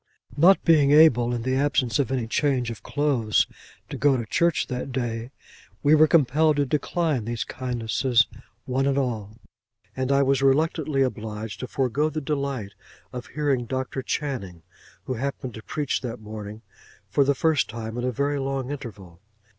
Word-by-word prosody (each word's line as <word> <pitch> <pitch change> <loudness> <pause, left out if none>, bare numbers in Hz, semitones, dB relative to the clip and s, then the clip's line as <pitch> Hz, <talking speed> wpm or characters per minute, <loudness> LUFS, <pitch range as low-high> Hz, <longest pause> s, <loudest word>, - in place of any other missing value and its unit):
Not 180 +6 +5
being 155 -4 +5
able, 140 -6 +6
in 120 -1 -2
the 130 +1 0
absence 130 -4 +1
of 135 -4 0
any 130 -3 -1
change 125 0 0
of 115 - -9
clothes, 140 -7 +1 0.5
to - - -4
go 140 -1 +3
to 120 - -3
church 170 +8 +1
that 125 +1 -5
day, 120 -2 -3 0.5
we 145 +1 +5
were 155 0 +6
compelled 155 0 +3
to 145 0 +1
decline 150 -2 -1
these 115 -1 -2
kindnesses, 120 -1 0 0.4
one 135 +2 0
and 140 0 +1
all; 110 -5 -2 0.6
and 130 +1 -1
I 140 0 +4
was 135 0 +2
reluctantly 145 0 +2
obliged 110 -3 -4
to 125 - -5
forego 135 +4 0
the 155 - -3
delight 140 -8 -3 0.4
of 125 -1 -6
hearing 140 -5 -1
Dr. 130 +1 -3
Channing, 120 - -4 0.4
who 130 - -3
happened 130 0 -4
to 110 - -9
preach 145 +3 -2
that 120 -1 -5
morning 105 0 -8 0.5
for 140 - +4
the 140 +1 +2
first 160 -1 +1
time 110 0 -6
in 120 - -3
a 125 - 0
very 140 +4 -1
long 135 -1 -3
interval. 100 -11 -9
130 Hz, 170 wpm, -25 LUFS, 115-145 Hz, 0.6 s, able